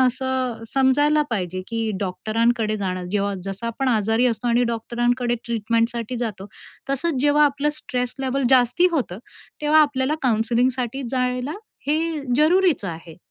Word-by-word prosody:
असं 255 -2 0
समजायला 290 +3 +3
पाहिजे, 185 -4 -2
की 225 -1 -2
डॉक्टरांकडे 215 +3 0
जाणं 185 -2 -3
जेव्हा 200 -1 0
जसं 195 +4 -5
आपण 255 +3 -1
आजारी 225 +1 +2
असतो 240 0 -1
आणि 240 +1 +3
डॉक्टरांकडे 240 +1 0
ट्रीटमेंटसाठी 230 +1 -1
जातो, 215 -5 -4 0.4
तसंच 275 0 0
जेव्हा 295 +1 +5
आपलं 285 0 +1
स्ट्रेस 250 -1 -3
लेव्हल 270 0 -1
जास्ती 255 +6 +4
होतं 245 - -2 0.4
तेव्हा 305 +1 +5
आपल्याला 285 -1 0
काउन्सलिंगसाठी 245 +2 +1
जायला 250 +1 -1 0.3
हे 300 +2 +2 0.4
जरुरीचं 325 - +3
आहे. 165 -1 -9
245 Hz, 130 wpm, -22 LUFS, 225-270 Hz, 0.4 s, जेव्हा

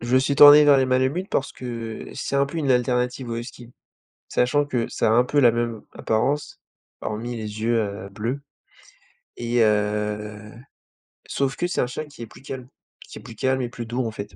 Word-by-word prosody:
Je 120 +2 -1
me - - +7
suis 140 +2 0
tourné 145 +1 +9
vers 145 -1 +6
les 130 - +2
malamutes 130 +9 0
parce 140 - -1
que 115 -3 -6
c'est 140 - -3
un 140 0 +3
peu, 165 +4 -5
une 145 -4 0
alternative 125 0 0
au 115 - -3
Husky. 120 0 -9 0.6
Sachant 140 +4 +2
que 125 -5 -2
ça - - 0
a - - +3
un 120 +2 +4
peu 145 +3 -1
la 120 -4 +6
même 115 -2 -2
apparence, 135 +7 -1 0.4
hormis 115 +3 -4
les 110 -1 -6
yeux, 115 +1 +2
heu, 100 -2 -3
bleus 115 +7 -3 1.0
et 120 0 +1
heu, 105 0 -1 0.8
sauf 135 -1 -1
que 175 - -1
c'est 175 - -1
un - - 0
chien 125 +5 -5
qui 145 -5 -14
est 115 - -6
plus - - -16
calme, 130 -2 -7 0.4
qui - - -10
est - - -14
plus 115 -2 -11
calme 130 +3 0
et 120 - -3
plus 120 0 -7
doux 120 +2 -2
en 115 - -3
fait 105 -1 -8
120 Hz, 210 wpm, -23 LUFS, 110-135 Hz, 1.0 s, tourné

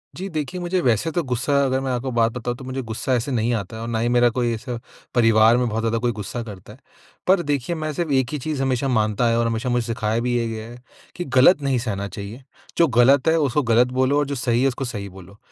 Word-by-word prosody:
जी 190 +3 -5
देखिए, 155 +2 -4
मुझे 175 +1 0
वैसे 120 +5 +1
तो 175 - 0
गुस्सा 125 +2 -1
अगर 130 0 0
मैं 135 - -2
आपको 125 +1 -2
बात 115 -1 +2
बताऊँ 120 0 -4
तो 135 - -10
मुझे 130 +1 -4
गुस्सा 115 +3 -3
ऐसे 125 +3 -1
नहीं 120 0 0
आता 110 -1 -4
है 110 - -7
और 115 - -5
ना 115 -1 -1
ही 120 - 0
मेरा 120 0 +4
कोई 120 -1 +1
ऐसा 120 +2 -5 0.4
परिवार 115 -1 +5
में 125 -1 +1
बहुत 110 +1 -2
ज़्यादा 115 0 0
कोई 120 +1 0
गुस्सा 105 +2 -5
करता 105 -1 -11
है। 130 - -18 0.5
पर 185 0 +4
देखिए 145 +3 -1
मैं 155 -1 -3
सिर्फ़ 165 -1 -2
एक 130 -2 +2
ही 150 - -1
चीज़ 145 0 -3
हमेशा 135 0 0
मानता 110 -1 +1
आया 115 -1 +2
हूँ 115 - +2
और - - 0
हमेशा 115 +3 -2
मुझे 120 -1 0
सिखाया 110 -1 -1
भी 120 +1 -1
ये 115 - -1
गया 110 0 -6
है 120 - -10 0.4
कि 175 - -3
ग़लत 145 +3 +5
नहीं 135 -2 +1
सहना 100 -4 -3
चाहिए। 100 +6 -8 0.3
जो 170 - +5
ग़लत 130 +4 +4
है 160 - +4
उसको 145 0 +1
ग़लत 120 +1 +4
बोलो 130 +2 +3
और 145 - +1
जो 140 - -3
सही 120 -1 0
है 135 - +4
उसको 135 0 -2
सही 100 -5 -5
बोलो। 95 +2 -14
120 Hz, 265 wpm, -22 LUFS, 115-135 Hz, 0.5 s, परिवार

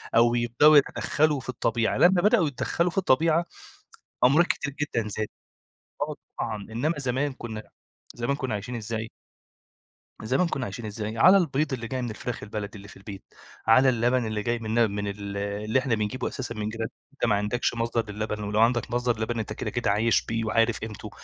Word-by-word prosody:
أو 120 +1 +5
يبدأوا 120 +6 +5
يتدخلوا 150 +1 +2
في 130 - -10
الطبيعة، 115 -2 0
لمّا 175 0 +5
بدأوا 195 -5 +4
يتدخلوا 170 +5 -1
في - - -13
الطبيعة 165 0 +3 0.8
أمراض 155 +7 +5
كتير 140 -1 -2
جدًا 115 -7 -1
زادت، 105 +1 -3 0.7
آه - - -2 0.2
طبعًا، 110 -2 -2 0.2
إنّما 145 +9 0
زمان 135 +2 -1
كُنّا 110 -4 -7 0.5
زمان 120 +4 -1
كُنّا 130 -5 -3
عايشين 110 +5 -4
إزاي؟ 110 0 -4 1.1
زمان 135 +11 +2
كُنّا 135 -6 -2
عايشين 110 +3 -6
إزاي؟ 110 +1 -5
على 185 +10 +7
البيض 150 -4 0
اللي 115 -3 -4
جاي 130 +1 -3
من 120 - -3
الفراخ 115 +2 -5
البلدي 105 0 -5
اللي 100 0 -12
في - - -13
البيت، 95 0 -9 0.4
على 130 +4 +6
اللبن 120 0 +2
اللي 110 -1 -2
جاي 120 0 0
من 110 +1 -1
ل 115 - +5
من 100 0 -3
ال 100 0 -5
اللي 105 +4 -1
إحنا 125 -3 0
بنجيبه 105 +4 -2
أساسًا 125 -3 -5
من 105 0 -3
جيرا 115 0 -4 0.3
أنت - - -1
ما 105 -3 +3
عندكش 105 +5 0
مصدر 115 -2 -1
للبن 105 0 -3
ولو 105 +1 -1
عندك 120 0 +2
مصدر 120 -2 0
لبن 115 +1 -1
أنت 110 -1 -3
كده - - -4
كده 120 -4 0
عايش 110 +2 +2
بيه 115 0 -2
وعارف 115 +1 +2
قيمته، 110 -2 -7
115 Hz, 190 wpm, -26 LUFS, 110-130 Hz, 1.1 s, على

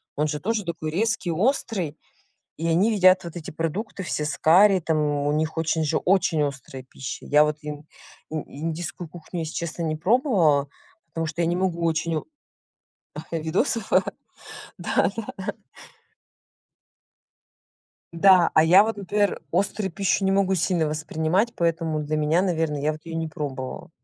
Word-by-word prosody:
Он 150 +1 +1
же 150 -1 -3
тоже 220 +3 -1
такой 165 -3 -4
резкий, 190 -1 0
острый. 190 - -1 0.6
И 165 - -2
они 195 +7 +3
едят 185 -1 +5
вот 170 0 -8
эти 165 - -6
продукты 180 +7 -4
все 155 -4 -2
с 155 - -3
карри, 190 +4 +5
там, 160 -1 0
у 145 -1 0
них 155 +1 -1
очень 160 0 0
же, 150 - 0
очень 180 -5 +2
острая 140 -2 -5
пища. 130 0 -8
Я 150 +1 +5
вот 150 0 -2
ин 150 0 -7 0.4
ин 155 -1 -3
индийскую 165 +4 -5
кухню, 170 +1 -7
если 160 0 -4
честно 170 0 -4
не 155 -1 -1
пробовала, 175 - +2 0.4
потому 165 0 -3
что 155 +3 -5
я 165 - +2
не 175 +1 0
могу 175 -2 -1
очень 165 0 0
о - - -8 1.1
видосов, 185 - -1 0.9
да, - - +1
да. 210 -4 -5 2.6
Да. 180 0 +5
А 155 - +6
я 180 +5 +7
вот, 225 -2 -3
например, 205 +1 0
острую 200 0 0
пищу 195 +2 0
не 190 - +2
могу 195 -1 +2
сильно 175 -2 +1
воспринимать, 160 +8 -1
поэтому 165 -2 0
для 150 +1 -2
меня, 155 +4 +2
наверно, 165 -5 0
я 150 +2 0
вот 155 - -9
её 165 - -5
не 165 0 -2
пробовала. 135 -2 -6
165 Hz, 155 wpm, -24 LUFS, 155-190 Hz, 2.6 s, я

